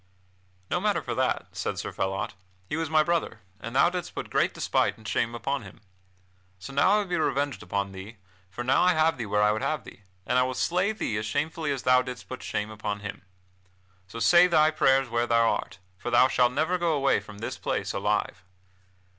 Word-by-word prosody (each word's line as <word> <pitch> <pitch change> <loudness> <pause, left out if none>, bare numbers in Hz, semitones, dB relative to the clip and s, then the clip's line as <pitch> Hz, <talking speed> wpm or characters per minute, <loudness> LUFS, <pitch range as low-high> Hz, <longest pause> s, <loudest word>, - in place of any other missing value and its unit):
"No - - +1
matter - - 0
for - - -3
that," - - 0
said - - -3
Sir - - -4
Phelot, 95 +3 -2 0.3
"he - - -3
was 165 -2 -2
my 155 -1 +4
brother, 170 0 -1 0.2
and 115 +6 -7
thou 170 +6 +5
didst 180 -1 -5
put - - -6
great - - +2
despite - - 0
and 110 - -11
shame 115 +3 0
upon 140 +3 -2
him. - - -13 0.8
So 100 +9 -9
now 180 +8 +4
I - - +5
will 210 - 0
be 180 - -2
revenged 140 0 -1
upon 100 -1 -2
thee, 95 +4 -10 0.3
for 120 +6 -6
now 130 +2 +3
I 180 0 +5
have 155 -3 +2
thee 115 - -3
where 105 +1 +2
I 105 - +4
would 110 - -2
have 155 -3 -1
thee, - - -13 0.2
and 125 +4 +2
I - - +4
will 130 0 -2
slay 180 +8 +1
thee 120 - -3
as 110 0 -3
shamefully 150 +5 -2
as 135 -3 -3
thou 125 0 +5
didst 125 -1 -8
put 130 - -7
shame 105 +1 -3
upon 105 -1 -4
him. 100 -1 -7 0.9
So 100 - -9
say 175 +9 +6
thy 155 -3 +4
prayers 135 -3 +3
where 120 0 0
thou 115 -1 +3
art, 95 - -4 0.2
for - - -4
thou 120 +1 +5
shalt 125 -1 +2
never 160 +6 0
go 170 -2 +1
away 140 -2 +2
from 105 - -12
this 110 - -5
place - - -2
alive." 90 - -1
130 Hz, 220 wpm, -27 LUFS, 110-155 Hz, 0.9 s, say